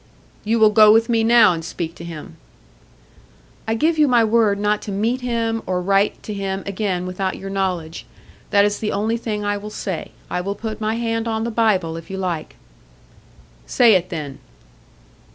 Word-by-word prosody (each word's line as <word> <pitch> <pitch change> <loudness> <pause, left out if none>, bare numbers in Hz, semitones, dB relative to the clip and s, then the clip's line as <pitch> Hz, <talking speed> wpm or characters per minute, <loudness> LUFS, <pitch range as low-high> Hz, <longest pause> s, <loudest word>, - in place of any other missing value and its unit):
"You 225 +2 +1
will 215 -1 +5
go 215 0 +7
with 225 +2 +3
me 230 -1 +2
now 225 -4 +6
and 165 -1 -5
speak 165 0 -5
to 170 - -11
him." 165 -3 -9 1.3
"I 225 - 0
give 315 +6 +1
you 300 - +5
my 240 -3 +4
word 220 -2 +2
not 210 0 0
to 205 - -6
meet 225 +6 -1
him 230 -2 -1
or 185 -1 0
write 195 +3 +1
to 210 - -5
him 195 -1 -3
again 195 -2 -2
without 185 +1 -3
your 195 0 -7
knowledge. 180 -5 -3 0.4
That 200 0 +4
is 205 0 -1
the 215 - -2
only 220 +3 -1
thing 210 -3 -4
I 205 0 0
will 210 +1 -7
say. 190 -5 -5 0.2
I 180 - -2
will 200 +2 -3
put 220 0 -6
my 215 +1 0
hand 230 0 -2
on 220 -1 -1
the 235 - -2
Bible 190 -8 +1
if 165 0 -11
you 190 - -5
like." 175 -4 -4 1.1
"Say 235 -3 +5
it, 185 -1 +1
then." 150 -5 -6
205 Hz, 190 wpm, -20 LUFS, 185-225 Hz, 1.3 s, go